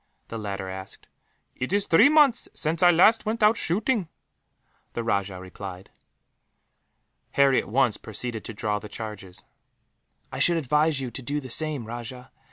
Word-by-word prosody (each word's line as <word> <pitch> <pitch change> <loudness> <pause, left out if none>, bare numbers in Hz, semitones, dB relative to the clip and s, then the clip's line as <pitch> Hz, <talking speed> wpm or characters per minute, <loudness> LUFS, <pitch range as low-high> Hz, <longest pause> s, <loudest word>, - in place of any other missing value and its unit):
the 115 - -5
latter 100 -2 -4
asked. 95 0 -9 0.5
"It 130 - -4
is 200 0 +1
three 215 +12 +6
months 290 -6 +4
since 160 +2 -1
I 180 - +7
last 190 +7 +5
went 225 +1 -1
out 210 +2 +6
shooting," 205 +1 -1 0.8
the 115 - -3
rajah 100 -4 -1
replied. 95 0 -9 1.4
Harry 135 -2 +4
at - - -12
once 120 -2 +2
proceeded 110 +1 -5
to 115 - -5
draw 105 0 -1
the 105 - -10
charges. 95 -4 -8 0.9
"I - - -5
should 170 -1 +4
advise 150 0 +1
you 125 -2 -4
to 135 - -5
do 145 +4 -2
the 130 -4 -9
same, 150 -3 -1
Rajah. 120 +2 -8
130 Hz, 160 wpm, -25 LUFS, 105-165 Hz, 1.4 s, I